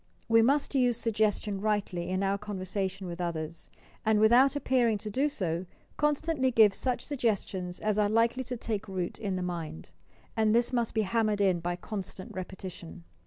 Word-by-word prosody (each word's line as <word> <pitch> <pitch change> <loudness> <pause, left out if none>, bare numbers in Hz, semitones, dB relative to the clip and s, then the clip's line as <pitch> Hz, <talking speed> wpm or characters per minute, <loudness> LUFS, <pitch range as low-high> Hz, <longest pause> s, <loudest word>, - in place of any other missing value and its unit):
We 225 0 +5
must 280 +6 +2
use 250 -4 +3
suggestion 215 -3 0
rightly 200 -5 -1
in 185 +1 0
our 195 +1 +1
conversation 195 -1 -3
with 175 0 -5
others, 165 -1 -4 0.3
and, 220 -1 +3
without 245 +6 +5
appearing 245 -6 +2
to 210 +1 -6
do 275 +7 +1
so, 180 - -2 0.3
constantly 295 -2 +1
give 220 -5 +6
such 250 +4 -1
sug 285 -3 -5
gestions 190 -5 -1
as 215 0 0
are 205 -1 +3
likely 230 +4 +2
to 250 0 -4
take 215 -2 -3
root 185 -3 -3
in 200 -4 -2
the 185 - -2
mind; 170 - -5 0.4
and 220 0 +3
this 240 +2 +2
most 235 -2 0
be 220 - +3
hammered 215 0 +1
in 190 -3 +3
by 175 +1 -2
constant 190 0 -7
repetition. 185 - -8
210 Hz, 175 wpm, -29 LUFS, 185-235 Hz, 0.4 s, give